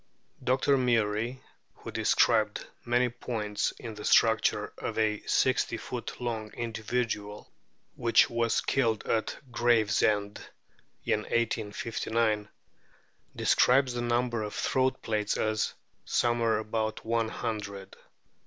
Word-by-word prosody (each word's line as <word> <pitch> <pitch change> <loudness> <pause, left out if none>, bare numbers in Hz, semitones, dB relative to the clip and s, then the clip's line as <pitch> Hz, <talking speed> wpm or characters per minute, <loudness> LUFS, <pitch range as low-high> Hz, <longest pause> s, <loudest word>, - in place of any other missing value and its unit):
Dr. 135 +2 +2
Murie, 115 0 0 0.3
who - - -9
described - - +2 0.2
many 120 +1 +2
points 110 -4 -2
in 115 -2 -8
the 105 0 -9
structure 110 0 +3
of - - -4
a 105 -1 +1
sixty - - +2
foot - - -6
long 110 -3 -3
individual 110 -2 -3 0.4
which 115 -1 +4
was 115 -1 +1
killed 115 -5 +1
at 110 -1 -1
Gravesend 110 -3 +2 0.7
in - - +2
1859, 110 -1 -1 0.9
describes 130 0 +3
the 120 - -2
number 120 -1 0
of 105 -1 -5
throat 130 0 0
plaits 105 -2 -1
as 110 -1 0 0.3
"somewhere 120 -2 +1
about 110 0 -3
one 115 0 0
hundred." 100 -4 -5
115 Hz, 105 wpm, -29 LUFS, 105-120 Hz, 0.9 s, which